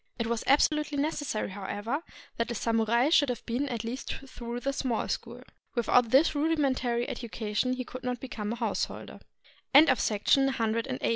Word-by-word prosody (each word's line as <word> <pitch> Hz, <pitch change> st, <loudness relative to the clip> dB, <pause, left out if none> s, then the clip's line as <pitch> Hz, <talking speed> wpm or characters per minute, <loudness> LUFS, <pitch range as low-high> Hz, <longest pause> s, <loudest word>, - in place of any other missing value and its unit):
It 230 Hz, -, -1 dB
was 230 Hz, 0 st, -1 dB
absolutely 300 Hz, +1 st, +3 dB
necessary, 290 Hz, -8 st, -2 dB
however, 205 Hz, +8 st, -3 dB, 0.4 s
that 230 Hz, -, -1 dB
a 235 Hz, -, -3 dB
samurai 230 Hz, +4 st, +2 dB
should 295 Hz, -4 st, +4 dB
have 245 Hz, -, -4 dB
been 260 Hz, +5 st, -1 dB
at 235 Hz, -3 st, -3 dB
least 240 Hz, +4 st, -4 dB
through 240 Hz, -2 st, -6 dB
the 275 Hz, +2 st, -1 dB
Small 255 Hz, -4 st, -1 dB
School. -, -, -5 dB, 0.3 s
Without 240 Hz, 0 st, +3 dB
this 275 Hz, +8 st, +5 dB
rudimentary 275 Hz, -6 st, +1 dB
education 225 Hz, +1 st, -2 dB
he 255 Hz, 0 st, -4 dB
could 255 Hz, +1 st, -9 dB
not 250 Hz, -1 st, -2 dB
become 220 Hz, -5 st, -5 dB
a -, -, -2 dB
householder. 230 Hz, -1 st, -3 dB, 0.6 s
HOW 285 Hz, -, +12 dB
TO -, -, +5 dB
LEARN -, -, +2 dB
JAPANESE 270 Hz, +6 st, +2 dB
BY 230 Hz, -, +1 dB
REV. 225 Hz, +2 st, -1 dB
M. 255 Hz, -1 st, -3 dB
245 Hz, 185 wpm, -29 LUFS, 230-275 Hz, 0.6 s, HOW